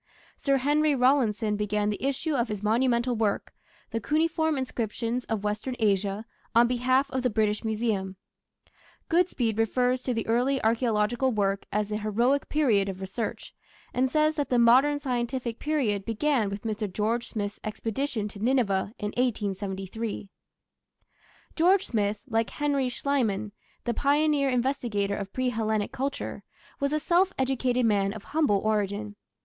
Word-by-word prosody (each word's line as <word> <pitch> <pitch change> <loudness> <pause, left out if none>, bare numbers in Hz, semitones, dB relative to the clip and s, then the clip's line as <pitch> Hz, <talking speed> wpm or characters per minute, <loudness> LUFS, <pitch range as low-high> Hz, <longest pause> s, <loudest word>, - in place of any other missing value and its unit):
Sir 275 -1 +1
Henry 295 +2 +2
Rawlinson 240 -5 +2
began 210 0 0
the 205 - -5
issue 280 +3 -1
of 245 -3 +1
his 210 -2 -5
monumental 240 +2 +2
work 215 -3 -1 0.4
The 230 - -1
Cuneiform 315 - +1
Inscriptions 240 -1 -2
of 220 -2 -2
Western 210 +5 -2
Asia 200 0 0 0.3
on 235 +1 +6
behalf 255 +3 +2
of 260 0 -1
the 250 - +1
British 215 -1 0
Museum. 215 -4 -1 0.9
Goodspeed 275 - +1
refers 250 +3 +1
to 255 - -1
the 225 - -2
early 250 +4 +2
archaeological 230 +2 +2
work 200 -3 0
as 210 0 0
the 210 - -1
"Heroic 235 +6 +1
Period" 225 -10 +2
of 190 -1 -6
research, 195 +4 -5 0.4
and 260 +1 +2
says 305 +2 +2
that 290 - -1
the 250 - +2
"Modern 260 +5 +5
Scientific 245 -2 -2
Period" 255 -10 0
began 230 0 +1
with 200 0 -6
Mr. 215 -2 -3
George 225 +5 -1
Smith's 205 -2 -4
expedition 225 +1 -2
to 205 - -10
Nineveh 215 -4 +1
in 210 - -3
1873. 205 -2 -3 1.3
George 365 +4 +4
Smith, 210 -2 0
like 225 -2 0
Henry 280 -3 0
Schliemann, 225 -6 -1 0.3
the 235 - -1
pioneer 290 +2 +2
investigator 240 -6 0
of 200 -1 -5
pre 255 -1 0
Hellenic 220 -3 -1
culture, 275 +2 -3 0.4
was 280 0 0
a 305 - +1
self 360 +4 +3
educated 255 -2 +1
man 200 -2 +2
of 215 -2 -9
humble 300 -10 +2
origin. 205 0 -1
235 Hz, 145 wpm, -27 LUFS, 210-265 Hz, 1.3 s, on